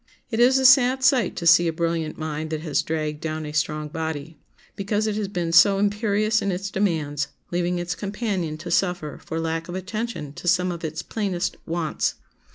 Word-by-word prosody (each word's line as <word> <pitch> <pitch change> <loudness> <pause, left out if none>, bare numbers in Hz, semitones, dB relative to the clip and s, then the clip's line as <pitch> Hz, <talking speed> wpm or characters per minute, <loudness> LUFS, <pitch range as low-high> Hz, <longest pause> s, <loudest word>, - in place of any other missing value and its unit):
It 225 - -1
is 255 +2 +6
a 265 - +1
sad 260 0 +6
sight 250 -6 +3
to 170 - -4
see 170 +1 +6
a - - +1
brilliant 165 -1 -2
mind 155 0 -4
that 155 -1 -3
has 155 -3 0
dragged 155 -1 -3
down 155 -1 -3
a 150 - -5
strong 150 0 -1
body, 160 -1 -5 0.4
because 205 +2 -1
it 215 -1 -1
has 210 -1 -2
been 175 -4 -2
so 195 +4 +6
imperious 210 +1 +1
in 200 - 0
its 195 +2 -4
demands, 155 -8 0 0.2
leaving 175 0 0
its 175 0 -2
companion 195 -5 -3
to 170 +2 -7
suffer 180 -4 0
for 160 - -4
lack 165 0 -2
of 175 - -6
attention 190 -5 -4
to 175 - -8
some 180 +1 +3
of 170 -1 -7
its 160 0 -4
plainest 190 -5 -2
wants. 165 -2 -1
175 Hz, 195 wpm, -24 LUFS, 160-205 Hz, 0.4 s, is